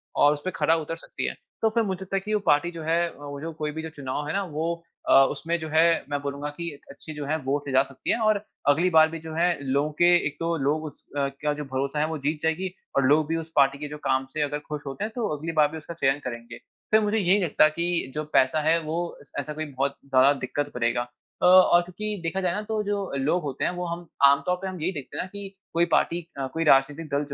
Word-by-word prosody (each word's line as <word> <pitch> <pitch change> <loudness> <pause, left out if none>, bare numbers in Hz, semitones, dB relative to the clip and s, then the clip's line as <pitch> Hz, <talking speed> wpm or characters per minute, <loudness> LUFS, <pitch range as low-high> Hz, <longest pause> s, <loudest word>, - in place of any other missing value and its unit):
और 145 +1 +5
उसपे 150 +5 -4
खरा 160 +2 +3
उतर 160 +1 -4
सकती - - -6
है, - - -2 0.3
तो 225 - +4
फिर 230 +1 +1
मुझे 190 -2 -3
लगता 190 +1 -4
है - - +3
कि 215 - -2
वो 210 - +3
पार्टी 150 +4 +3
जो 165 -2 -7
है, 170 +2 +2
अ, - - -15
वो 145 0 -6
जो 165 +1 -4
कोई 150 -1 -3
भी 160 - -5
जो 160 - -6
चुनाव 145 -1 -4
है 150 - -2
ना, 200 - 0
वो 165 0 -3 0.3
अ, - - +6 0.2
उसमें 170 +1 -2
जो 160 - -5
है, 165 +2 +4
मैं 145 - -1
बोलूँगा 140 +1 -4
कि 170 +3 -5 0.2
अच्छी 155 +3 -9
जो 150 -1 -5
है 155 +3 0
वोट 140 +2 -1
ले 135 - -3
जा 130 - +6
सकती 135 -1 -4
है - - +2
और 215 -2 +3 0.3
अगली 160 +6 +4
बार 160 -2 +6
भी 165 - -6
जो 160 -1 -7
है, 175 +2 +2
लोगों 140 +3 0
के 175 - +6 0.2
एक 145 - -6
तो 165 0 0
लोग 150 +2 0
उस 150 - -10
अ, 140 -1 +2 0.2
का 150 0 +2
जो 150 0 -5
भरोसा 135 +2 -2
है, 150 - +2
वो 160 0 -3
जीत 150 +2 -1
जाएगी 175 +3 -1 0.2
और 140 - +4
लोग 150 +2 +4
भी 165 - -1
उस 160 0 -6
पार्टी 140 -1 +4
के 150 +1 -5
जो 150 +1 -7
काम 130 0 +2
से 155 - -1
अगर 145 0 -1
खुश 150 -1 -4
होते 135 +9 -4
हैं, 220 - -3
तो 235 -4 -1
अगली 160 +3 -4
बार 155 -2 +4
भी 160 - -6
उसका 160 +2 -8
चयन 140 -3 +1
करेंगे। 120 -1 -6 0.3
फिर 220 0 +6
मुझे 210 +1 +1
ये 190 -3 +3
नहीं 205 - +3
लगता 155 -2 +5
कि 170 -3 -1
जो 155 - -1
पैसा 130 +4 +4
है, 160 +2 +3
वो 165 +2 -3
ऐस 140 - -19
ऐसा 150 +2 -4
कोई 155 +1 -4
बहुत 140 +1 -1
ज़्यादा 135 +1 +5
दिक्कत 145 +3 -3
करेगा। 120 0 +1 0.4
अ, - - +3
और 180 -1 +7
क्योंकि 205 +4 -5
देखा 175 +4 -1
जाये 180 -2 0
ना, 210 - -2
तो 215 0 -2
जो 200 -1 -2
लोग 150 +7 +1
होते 140 -2 -2
हैं, - - +1
वो 180 0 -4
हम 170 0 -5 0.2
आम 140 0 +6
तौर 180 - +2
पे 195 - -3
हम 185 -3 -6
यही 175 +4 0
देखते 145 -6 -7
हैं - - -1
ना - - -7
कि 200 -1 -6 0.2
कोई 170 +1 +3
पार्टी 170 -1 +1
अ, 135 - -1
कोई 165 - 0
राजनीतिक 150 +2 +3
दल 145 +1 +1
155 Hz, 275 wpm, -26 LUFS, 145-175 Hz, 0.4 s, और